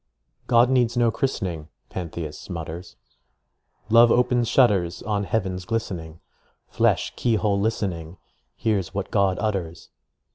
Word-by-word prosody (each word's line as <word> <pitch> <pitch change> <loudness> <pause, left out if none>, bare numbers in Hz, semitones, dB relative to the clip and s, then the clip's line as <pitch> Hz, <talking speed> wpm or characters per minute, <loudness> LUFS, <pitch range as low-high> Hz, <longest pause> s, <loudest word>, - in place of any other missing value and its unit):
"God 120 +1 +4
needs 120 -2 +2
no 120 -1 +3
christening," 90 - -2 0.2
Pantheist 85 -3 -6
mutters, 85 0 -6 0.9
"Love 115 +1 +7
opens 120 -1 +2
shutters 100 -10 +2
On 105 -2 -1
heaven's 95 -4 -2
glistening. 90 -7 -4 0.5
Flesh, - - +1
key 120 -2 +1
hole 105 -2 +1
listening, 95 -5 -2 0.4
Hears 105 -5 -1
what 100 - -3
God 100 -3 +2
utters" 90 -6 -3
100 Hz, 115 wpm, -24 LUFS, 85-115 Hz, 0.9 s, Love